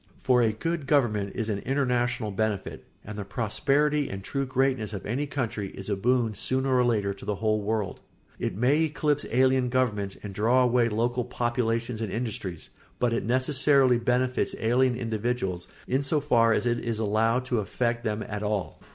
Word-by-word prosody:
For 125 -1 +4
a 115 -2 +3
good 160 +6 -3
government 110 -9 +1
is 115 - -2
an 105 -3 -1
international 125 -4 0
benefit, 105 -1 -2 0.2
and 105 - -7
the - - -3
prosperity 140 +7 0
and 95 0 -6
true 135 +5 -2
greatness 130 -4 0
of 100 - -6
any 135 +7 -2
country 115 -7 -3
is 95 +2 -6
a - - +2
boon 120 +2 +1
sooner 130 +5 -1
or 125 - +4
later 105 -5 +1
to 100 - -14
the 105 0 -2
whole 110 +1 0
world; 105 -2 -2 0.4
it - - -2
may 135 +7 +3
eclipse 150 -1 -1
alien 130 0 +3
governments 110 -6 0
and 100 -2 -6
draw 120 +6 +3
away 120 -1 +3
local 120 +3 0
populations 120 -1 -1
or 110 - -2
industries, 110 -6 -4 0.3
but 120 -2 +1
it 115 - -1
necessarily 130 +1 +3
benefits 125 +1 0
alien 125 +2 +2
individuals 110 -6 -2 0.2
in 130 +2 +1
so 145 +2 +1
far 120 -6 +3
as 110 - +1
it 120 0 +1
is 115 -2 -2
allowed 115 +3 +1
to 125 -3 0
affect 115 +3 -1
them 110 -1 -2
at 105 -1 -4
all. 105 -2 -2
120 Hz, 180 wpm, -27 LUFS, 105-130 Hz, 0.4 s, For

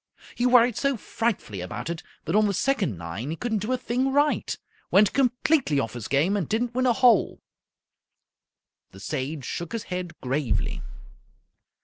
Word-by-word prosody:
He 245 - +1
worried 245 -2 +5
so 275 -2 +1
frightfully 205 - -2
about 105 +8 -5
it 170 -1 -4 0.2
that 165 - -1
on 215 0 +5
the 200 - -1
second 200 - 0
nine 85 - -5
he 160 - -2
couldn't 220 +3 -1
do 210 +5 -3
a 255 - +2
thing 255 +3 -1
right. 290 +2 +1 0.3
Went 200 +1 +5
completely 255 - +2
off 115 -5 -2
his 120 -2 -6
game 155 +9 +2
and 190 -7 -2
didn't 235 +2 0
win 255 +1 +1
a 245 - +4
hole." 235 -3 +4 1.5
The 95 - -14
Sage 140 +4 -4
shook 170 - -5
his 230 - -3
head 180 -2 -5
gravely. 135 0 -1
205 Hz, 165 wpm, -25 LUFS, -, 1.5 s, worried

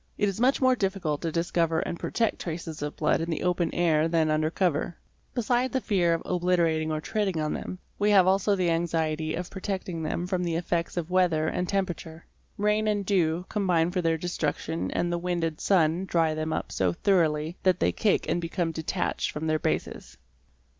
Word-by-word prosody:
It 205 - +2
is 195 +3 -3
much 260 +2 +3
more 255 -1 +4
difficult 190 -9 -1
to 165 - -2
discover 165 0 +1
and 170 - -4
protect 230 -2 -1
traces 165 -2 -5
of 150 0 -4
blood 155 - +1
in 165 - -3
the 160 - -2
open 180 -1 +1
air 160 -2 +2
than 160 -2 +2
under 155 0 +1
cover. 170 -1 0 0.4
Besides 245 +1 +1
the 260 - +2
fear 180 -8 +2
of 165 - -5
obliterating 170 -3 +1
or 155 - -1
treading 190 +1 -1
on 155 -1 -1
them, 185 - -5 0.2
we 205 +1 +3
have 195 -3 +6
also 195 +2 +3
the 180 -3 +1
anxiety 160 -2 0
of 180 +1 -5
protecting 190 -3 -4
them 160 +2 -2
from 180 -1 -1
the 170 -2 -1
effects 170 0 -2
of 175 0 -3
weather 170 -4 +2
and 180 +2 -2
temperature. 175 -4 -3 0.3
Rain 210 +1 +1
and 205 -2 0
dew 180 -3 +1
combine 180 -5 +1
for 180 0 0
their 165 -1 +1
destruction 160 -1 -2
and 175 0 -1
the 175 - -1
wind 175 -1 -1
and 160 -2 -2
sun 175 -1 +2
dry 165 -3 +1
them 155 0 -3
up - - -3
so 90 -2 +1
thoroughly 160 - +1
that 185 -2 +2
they - - +2
cake 210 - +1
and 175 - 0
become 165 0 -1
detached 160 +3 -2
from 155 +1 -4
their 155 0 +1
bases. - - -3
170 Hz, 200 wpm, -27 LUFS, 160-190 Hz, 0.4 s, have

